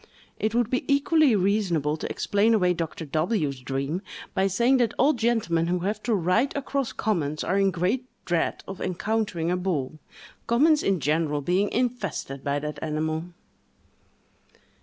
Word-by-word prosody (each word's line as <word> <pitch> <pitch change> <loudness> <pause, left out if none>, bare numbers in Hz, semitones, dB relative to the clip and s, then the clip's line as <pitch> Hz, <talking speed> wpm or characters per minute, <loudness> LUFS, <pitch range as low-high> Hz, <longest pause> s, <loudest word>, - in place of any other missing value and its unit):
It 215 +1 0
would 240 -1 +1
be 255 - 0
equally 285 -2 +4
reasonable 185 -7 +1
to - - -5
explain 215 +3 +2
away 180 -4 +3
Dr. 165 -1 -4
W——'s 155 - -1
dream, 135 +7 -3 0.3
by 190 +1 +2
saying 235 +7 +3
that 240 -3 +1
all 295 +3 +4
gentlemen 220 - +1
who 180 0 0
have 205 +3 -2
to 230 -1 +1
ride 195 +9 +1
across 275 -2 -2
commons 155 -8 -1
are 195 - +1
in 195 0 +4
great 190 +8 -1 0.2
dread 170 -2 -1
of 195 -1 -7
encountering 185 -2 -1
a 180 - +1
bull—commons 190 - 0
in 190 -5 0
general 150 0 +1
being 185 +7 +1
infested 210 - -2
by 140 0 0
that 150 +1 -5
animal! 155 +1 -2
185 Hz, 150 wpm, -26 LUFS, 160-230 Hz, 0.3 s, equally